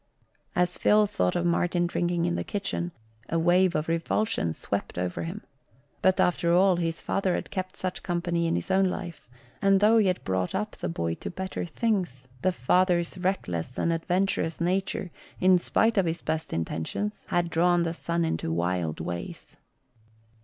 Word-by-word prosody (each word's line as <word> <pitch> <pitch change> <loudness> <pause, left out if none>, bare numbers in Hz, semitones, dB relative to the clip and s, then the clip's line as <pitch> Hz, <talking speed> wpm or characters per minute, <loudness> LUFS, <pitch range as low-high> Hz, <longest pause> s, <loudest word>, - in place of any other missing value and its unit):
As 180 0 +1
Phil 210 0 +5
thought 90 - 0
of 175 - 0
Martin 175 0 +2
drinking 175 0 0
in 175 - 0
the - - -1
kitchen, 190 -3 -3 0.4
a 165 - +1
wave 175 +2 +3
of 155 +1 0
revulsion 165 - 0
swept - - -4
over 90 0 -2
him; 175 +6 -5 0.6
but 190 0 +3
after 170 -1 +2
all, 185 0 +5
his 165 -1 -1
father 190 -2 0
had - - -5
kept 185 0 -4
such 185 -1 -3
company 170 -1 -1
in 165 - +1
his - - -3
own 190 0 +4
life, 175 -8 -6 0.3
and 195 -1 +5
though 220 +3 +5
he 210 - +3
had 180 -1 0
brought 95 -1 -1
up 210 +1 -1
the - - -5
boy 85 0 -1
to - - -6
better 190 0 -4
things, 180 - -1 0.2
the 185 - +3
father's 175 +2 +2
reckless 125 - -2
and 170 - +1
adventurous 175 0 0
nature, 185 +1 -1 0.3
in 185 -1 +5
spite 225 +4 +2
of 185 - +2
his 165 +1 -2
best 160 0 -2
intentions, 80 - -3
had 175 -1 +1
drawn 175 +1 +3
the 165 -1 -1
son 170 0 -1
into 160 - -2
wild 85 -1 -1
ways. 85 0 -6
175 Hz, 175 wpm, -27 LUFS, 165-185 Hz, 0.6 s, Phil